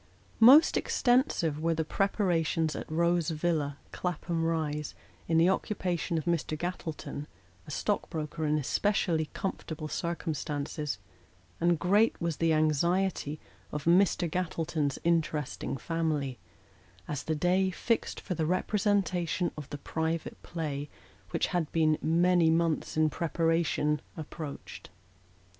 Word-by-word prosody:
MOST 265 +8 +8
extensive 245 - +2
were 165 +1 +1
the 160 0 -1
preparations 165 -5 +1
at - - -6
Hose 170 +1 +2
Villa, 155 -3 -1
Claphara 175 -1 -3
Rise, 160 -2 -1 0.3
in 165 - +2
the 165 +2 +5
occupation 180 -4 -1
of 155 - -3
Mr. 165 -2 0
Gattleton 160 -3 -5 0.4
(a - - -10
stock 205 +7 -1
broker 155 0 -4
in 150 +1 +2
especially 165 +2 +1
com 195 - -1
fortable 155 -1 -7
circumstances), 150 -3 -3 0.6
and 170 0 +3
great 205 +7 +3
was 170 -3 -2
the 165 -1 +2
anxiety 155 +1 +1 0.3
of 150 -1 -4
Mr. 175 +1 +4
Gattleton's 160 -4 -1
interesting 155 -5 0
family, 150 -6 -2 0.7
as 145 -2 -3
the 160 - -2
day 180 +4 +2
fixed 225 +5 -1
for 185 - -4
the 160 -2 -1
representation 185 -2 +1
of 150 -3 -8
the 145 - -5
Private 160 +2 -3
Play 150 -4 -4 0.4
which - - 0
had 170 -4 0
been 155 -2 +2
"many 170 +1 +4
months 165 -1 +1
in 155 -1 +3
preparation," 165 -1 +1 0.2
approached. 155 -1 -7
165 Hz, 125 wpm, -30 LUFS, 155-175 Hz, 0.7 s, MOST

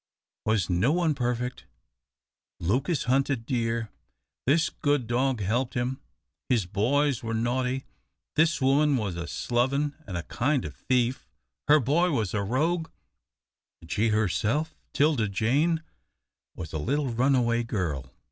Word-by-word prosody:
Was 110 -5 +2
no 90 +9 +2
one 170 -2 +2
perfect? 125 - -2 0.9
Lucas 130 - 0
hunted 135 -1 +1
deer, 115 -2 -1 0.6
this 160 +4 +3
good 145 -4 0
dog 125 0 0
helped 120 +6 0
him, 125 +2 -2 0.5
his 115 -7 +2
boys 125 +8 +1
were 115 -1 -3
naughty, 125 +3 -1 0.5
this 160 +2 +3
woman 140 +1 +3
was 100 -6 -2
a 85 0 -5
sloven 135 - 0
and 90 -3 -4
a 85 - -3
kind 135 - 0
of 75 - -7
thief, 125 0 0 0.4
her 150 +1 +7
boy 150 +8 +2
was 115 - -1
a 105 - 0
rogue, 160 - 0 0.9
and 80 - -12
she 110 +3 +2
herself 110 - +1 0.2
'Tilda 140 -7 +2
Jane 145 - +1 0.7
was 80 -3 -7
a 80 - -2
little 140 - 0
runaway 120 -1 +2
girl. 85 - -3
125 Hz, 135 wpm, -27 LUFS, 110-145 Hz, 0.9 s, her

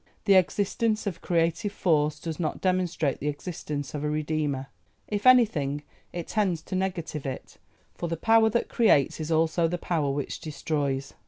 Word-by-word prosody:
The 200 - +5
existence 205 +4 +2
of 185 -4 -4
Creative 170 +3 0
Force 155 -6 +1
does 165 +1 -5
not 160 - -2
demonstrate 180 -6 0
the 145 - -3
existence 145 -2 -4
of 150 -1 -4
a 150 - 0
Redeemer; 150 -3 -1 0.4
if 210 +3 -1
anything, 155 - +4 0.3
it 175 -2 -5
tends 185 -7 0
to 185 - -5
negative 170 -6 -3
it, 130 - -7 0.3
for 170 - -4
the 165 - -2
power 225 +4 +4
that 235 +2 0
creates 180 - +3
is 155 +1 -4
also 165 +1 +2
the 175 +2 -2
power 160 -4 -1
which 140 0 -3
destroys. 140 -2 -2
165 Hz, 165 wpm, -27 LUFS, 150-185 Hz, 0.4 s, The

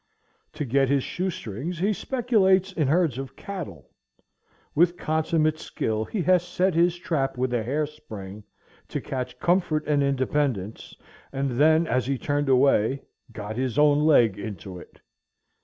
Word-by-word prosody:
To 155 -1 -4
get 135 +1 +2
his 140 -2 +2
shoestrings 170 - -4
he 200 +6 +1
speculates 200 -6 +2
in 155 -6 0
herds 155 -4 +2
of 135 -1 -7
cattle. 155 - -8 0.8
With 175 +2 +3
consummate 155 0 0
skill 110 -6 -2
he 195 - -3
has 180 0 +4
set 180 +1 0
his 170 +1 +2
trap 150 -8 -2
with 125 0 -1
a 120 - +1
hair 140 +7 -1
spring 105 -9 -10 0.4
to - - -3
catch 125 -1 -5
comfort 170 -4 +1
and 145 -1 +2
independence, 130 -6 -1 0.4
and 135 0 -2
then, 155 +6 +4
as 125 -3 0
he 135 -1 0
turned 145 +1 -1
away, 130 -1 +3 0.3
got 105 +1 -6
his 130 -1 -2
own 145 -1 +5
leg 120 -10 +4
into 95 -3 -7
it. - - -16
145 Hz, 150 wpm, -25 LUFS, 125-170 Hz, 0.8 s, own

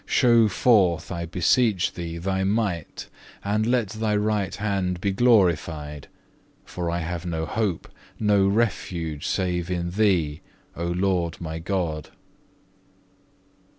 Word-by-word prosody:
Show 120 -4 +5
forth, 95 -6 +2
I 85 -2 -4
beseech 95 +3 +2
Thee, 85 -1 -5
Thy 95 +2 -1
might, 100 -4 -2 0.4
and 105 +2 0
let 120 -4 +1
Thy 110 0 -1
right 105 -2 0
hand 95 -4 -1
be 100 +2 0
glorified, 85 - +1 0.6
for 85 -2 -4
I 85 +1 -1
have 85 0 -4
no 80 -2 -2
hope, 100 0 -2 0.3
no 105 -2 +3
refuge, 90 -8 -1
save 90 -2 -1
in 85 -1 -2
Thee, 90 -7 +1 0.3
O 85 +1 -3
Lord 85 -2 0
my 80 -1 -5
God. 85 -4 -2
90 Hz, 120 wpm, -24 LUFS, 85-105 Hz, 0.6 s, Show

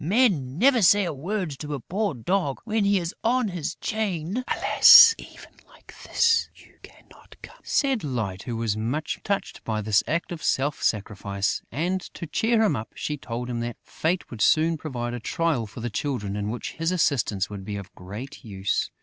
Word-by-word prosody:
Men 170 - +2
never 250 +3 +4
say 205 +1 +5
a 170 - -3
word 180 +4 -3
to 150 -1 -4
a - - -5
poor 195 - -2
dog 145 - -1
when 220 -2 0
he 200 0 +3
is 170 -1 -3
on 245 -1 +2
his 170 -4 -4
chain!" 210 0 -2
"Alas, 460 0 +8
even - - -13 0.2
like - - -17
this, 460 -1 +2
you - - -20
cannot - - -17
come!" - - -12
said 270 -5 0
Light, 110 -9 -3
who 120 -1 -5
was 115 -2 -1
much 125 +8 -3
touched 200 -1 -3
by 110 -1 -2
this 105 -1 +2
act 170 +3 -1
of 170 -2 -6
self 140 +1 0
sacrifice; 100 -1 -1
and, 180 +5 -1
to - - -6
cheer 225 +8 +1
him 200 -9 +2
up, 110 -1 -5
she 150 - -3
told 120 -3 -5
him 120 -1 -3
that 120 0 -4
fate 175 +3 -2
would 115 -3 -7
soon 160 +8 +4
provide 125 -6 -4
a 120 - -4
trial 145 -2 -1
for 115 - -10
the 120 - -3
Children 105 -6 -3
in 105 0 -3
which 120 +2 -4
his 165 +2 -2
assistance 120 - 0
would 100 -2 -7
be 105 +1 -5
of 100 -2 -8
great 105 +9 -9
use. 100 -4 -2
145 Hz, 190 wpm, -25 LUFS, 115-190 Hz, 0.2 s, Alas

